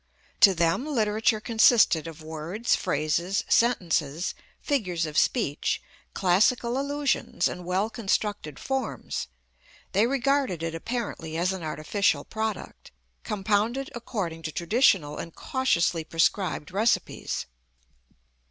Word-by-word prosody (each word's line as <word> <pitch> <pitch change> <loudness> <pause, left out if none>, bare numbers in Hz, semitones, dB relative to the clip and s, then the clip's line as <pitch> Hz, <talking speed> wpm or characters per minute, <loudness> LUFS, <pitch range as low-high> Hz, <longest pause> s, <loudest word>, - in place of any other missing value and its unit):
To 195 -2 +7
them 170 - +1
literature 220 -4 +1
consisted 220 -7 +4
of 160 -1 -10
words, 160 +9 -1
phrases, 170 +5 0
sentences, 170 - +1 0.3
figures 185 - -1
of 155 -1 -6
speech, 160 - +1 0.4
classical 235 +7 +2
allusions, 285 -9 0
and 180 -1 -6
well 185 +4 0
constructed 205 - -2
forms. 265 - -3 0.6
They 210 +4 +3
regarded 270 - 0
it 165 -1 -2
apparently 165 -4 -4
as 180 +3 +1
an 190 - -6
artificial 155 +6 0
product, 220 -1 -5 0.3
compounded 215 +5 0
according 200 -9 -4
to 160 - -4
traditional 170 - +2
and 165 - -7
cautiously 180 - 0
prescribed 165 0 0
recipes. 215 +5 0
195 Hz, 105 wpm, -26 LUFS, 165-235 Hz, 0.6 s, To